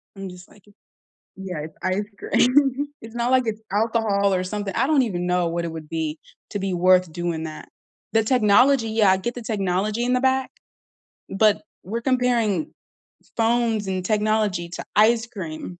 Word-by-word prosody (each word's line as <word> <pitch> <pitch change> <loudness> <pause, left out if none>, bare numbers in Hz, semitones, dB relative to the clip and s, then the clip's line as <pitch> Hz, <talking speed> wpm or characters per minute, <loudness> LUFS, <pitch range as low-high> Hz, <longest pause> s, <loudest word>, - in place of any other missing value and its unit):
I'm 195 -1 -7
just 180 +1 -13
like 205 -1 -21
it 205 - -20 0.6
Yeah, 180 -6 -5 0.2
it's 195 +3 -1
cream, 270 +2 +2
it's 225 +1 -11
not 240 +1 0
like 260 -1 +4
it's 220 0 -3
alcohol 205 -2 +1
or 185 - 0
something, 200 0 -4
I - - +2
don't 290 -2 +3
even 180 -7 -2
know 180 -1 +1
what 170 0 -2
it 165 - -4
would 160 -2 -8
be 160 -1 -3 0.3
to 205 - -3
be 195 -1 -2
worth 180 -1 +3
doing 170 -2 -3
that. 155 -1 -8 0.4
The 225 - +3
technology, 245 +2 +4
yeah, 220 -3 +4
I - - +3
get 240 +6 -4
the 245 - -7
technology 210 +2 -1
in 250 - 0
the 250 - +2
back, 265 0 +1 0.8
but 210 +4 +3 0.2
we're 225 +5 -3
comparing 240 - +1 0.6
phones 230 -2 +1
and 185 -1 -2
technology 210 -4 0
to - - -6
ice 225 +2 +4
cream. 175 -8 -7
205 Hz, 175 wpm, -23 LUFS, 180-235 Hz, 0.8 s, like